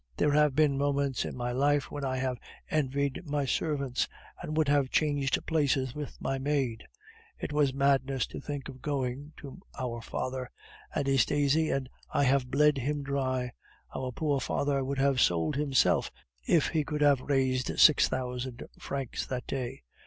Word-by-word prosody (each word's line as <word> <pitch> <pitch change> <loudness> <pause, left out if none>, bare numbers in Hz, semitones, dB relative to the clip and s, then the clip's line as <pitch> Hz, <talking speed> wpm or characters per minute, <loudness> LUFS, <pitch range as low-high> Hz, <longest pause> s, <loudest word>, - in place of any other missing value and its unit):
There 150 - +3
have 150 -2 +3
been 145 -2 +3
moments 140 -2 0
in - - -5
my 120 0 -2
life 140 +2 +1
when 145 - -5
I 130 -1 -1
have 130 -1 -2 0.3
envied 140 -2 0
my 145 -3 -1
servants, 140 -2 0 0.3
and 155 - -4
would 155 -2 +3
have 140 -2 +3
changed 145 -3 +1
places 140 -5 +1
with 150 -1 -7
my 135 0 -2
maid. 135 -5 -1 0.5
It - - -5
was 145 -2 +3
madness 135 -1 +2
to - - -7
think 145 -2 -5
of 130 - -10
going 140 +1 -3
to 140 +5 -10 0.2
our 120 -3 -3
father, 130 +2 -4 0.5
Anastasie 145 +3 +2
and 135 -2 -1 0.2
I - - +2
have 135 -1 +2
bled 150 +1 +3
him 145 +3 -2
dry; 130 -3 -1 0.4
our 130 -1 -3
poor 145 +1 0
father 140 +2 0
would 135 +1 -3
have 135 -2 +3
sold 85 - +2
himself 140 -3 +2 0.4
if 160 - +3
he 155 -2 +1
could 150 +1 -3
have 145 -3 +5
raised 130 -2 0
six 155 - +7
thousand 125 -1 -4 0.2
francs 135 -3 -4
that 125 -1 -4
way. 125 - -4
140 Hz, 165 wpm, -29 LUFS, 130-145 Hz, 0.5 s, six